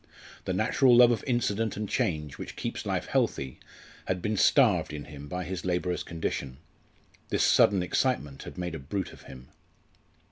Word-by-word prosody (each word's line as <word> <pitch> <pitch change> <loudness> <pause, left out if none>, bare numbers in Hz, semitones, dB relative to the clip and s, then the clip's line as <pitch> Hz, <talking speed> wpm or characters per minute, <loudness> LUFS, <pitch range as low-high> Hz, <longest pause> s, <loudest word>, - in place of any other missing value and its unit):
The - - -1
natural 130 -3 +4
love 120 0 +8
of 115 - -1
incident 115 -4 0
and 105 0 -3
change 75 -6 -2
which - - -7
keeps - - -4
life - - -1
healthy 65 -2 -1 0.5
had 90 - 0
been 105 +4 -1
starved 90 - +4
in 75 -1 -5
him 75 0 -10
by 90 +4 -4
his 90 -1 -5
labourer's 90 -1 -1
condition. 70 -5 -4 0.7
This - - +1
sudden 95 -3 +4
excitement 90 - -1
had - - -9
made 90 -2 -3
a 80 - -5
brute 90 +8 -4
of - - -14
him. 65 -1 -12
90 Hz, 170 wpm, -28 LUFS, 75-105 Hz, 0.7 s, love